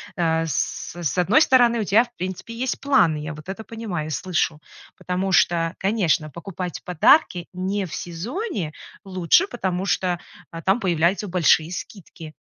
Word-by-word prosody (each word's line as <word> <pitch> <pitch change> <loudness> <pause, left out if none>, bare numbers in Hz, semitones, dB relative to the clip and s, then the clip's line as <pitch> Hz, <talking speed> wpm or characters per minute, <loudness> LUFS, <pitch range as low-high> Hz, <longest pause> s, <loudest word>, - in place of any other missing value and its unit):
э, 165 -1 +1
с 155 - -2
с 175 -1 -3
одной 190 - +4
стороны, 245 -5 +4
у - - 0
тебя, 220 +5 +5
в 240 0 -15
принципе, 185 +5 -5
есть 250 +3 -2
планы, 220 - +3
я 150 +1 -5
вот 155 +3 -12
это 220 +3 -5
понимаю 210 -10 -5
и - - -6
слышу. 155 +1 -1 0.4
Потому 185 +1 -2
что, 165 -1 +3
конечно, 185 -7 +1
покупать 175 +2 -6
подарки 180 - +3
не 190 +2 -2
в 165 - -9
сезоне 190 - -4 0.3
лучше, 185 - +3
потому 190 - -3
что, 180 -3 0 0.3
а, 165 0 -7
там 195 +7 +2
появляются 180 +3 +1
большие 170 -2 +3
скидки, 170 -5 -9
180 Hz, 160 wpm, -23 LUFS, 165-210 Hz, 0.4 s, тебя